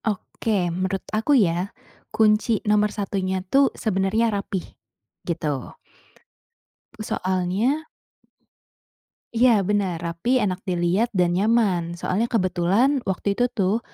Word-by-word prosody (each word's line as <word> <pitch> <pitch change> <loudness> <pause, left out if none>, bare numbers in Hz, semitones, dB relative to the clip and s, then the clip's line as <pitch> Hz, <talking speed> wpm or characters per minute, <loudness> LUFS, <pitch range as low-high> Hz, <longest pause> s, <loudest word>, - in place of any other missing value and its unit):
Oke. 200 -3 -1
Menurut 185 +2 -2
aku 225 +7 +3
ya, 180 -3 +1 0.4
kunci 215 +1 +2
nomor 210 0 +3
satunya 190 -2 -3
tuh 275 +7 +4
sebenarnya 215 +2 +1
rapi, 200 -2 -3 0.6
gitu. 150 -6 -3 1.3
Soalnya 200 - -1 1.5
Iya, 250 +2 +5 0.2
benar. 200 -4 +1
Rapi, 170 +6 -4
enak 185 -2 -1
dilihat, 180 +5 +1
dan 180 -2 +3
nyaman. 190 -4 +1
Soalnya 210 +7 0
kebetulan 200 +6 +2
waktu 190 +1 -2
itu 245 - +4
tuh, 200 +3 +1
195 Hz, 105 wpm, -23 LUFS, 180-220 Hz, 1.5 s, Iya